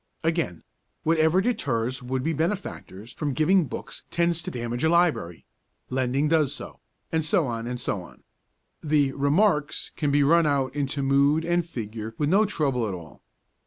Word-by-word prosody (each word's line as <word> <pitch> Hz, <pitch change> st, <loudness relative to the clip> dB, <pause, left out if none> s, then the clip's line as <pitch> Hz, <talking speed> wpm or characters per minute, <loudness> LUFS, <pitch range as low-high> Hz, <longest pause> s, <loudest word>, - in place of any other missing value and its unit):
Again, 160 Hz, -, -1 dB, 0.4 s
Whatever 160 Hz, +2 st, +3 dB
deters 130 Hz, -, -1 dB
would 130 Hz, +1 st, -2 dB
be 165 Hz, -, 0 dB
benefactors 155 Hz, -, -4 dB
from 145 Hz, -3 st, -2 dB
giving 175 Hz, +3 st, +4 dB
books -, -, -7 dB
tends 170 Hz, -1 st, +1 dB
to -, -, -5 dB
damage 120 Hz, +1 st, -4 dB
a 160 Hz, -, +4 dB
library; 165 Hz, -, +1 dB, 0.5 s
lending 130 Hz, +3 st, +1 dB
does 150 Hz, -3 st, +2 dB
so; -, -, -6 dB
ergo, -, -, -22 dB, 0.3 s
and 160 Hz, -1 st, +1 dB
so 175 Hz, 0 st, +2 dB
on 115 Hz, -2 st, -3 dB
and 125 Hz, 0 st, -4 dB
so 105 Hz, -5 st, -2 dB
on. 90 Hz, -, -15 dB, 0.6 s
The 145 Hz, -3 st, +2 dB
'Remarks' 150 Hz, +2 st, +1 dB
can 150 Hz, -, 0 dB
be 145 Hz, 0 st, +3 dB
run 165 Hz, +2 st, +4 dB
out 135 Hz, -2 st, +1 dB
into 140 Hz, -1 st, -1 dB
mood 140 Hz, +4 st, +3 dB
and 175 Hz, 0 st, +2 dB
figure 115 Hz, -7 st, -6 dB
with 145 Hz, -1 st, 0 dB
no 200 Hz, +5 st, +4 dB
trouble 135 Hz, -, 0 dB
at 95 Hz, -, -3 dB
all. 85 Hz, -4 st, -12 dB
145 Hz, 170 wpm, -25 LUFS, 125-165 Hz, 0.6 s, giving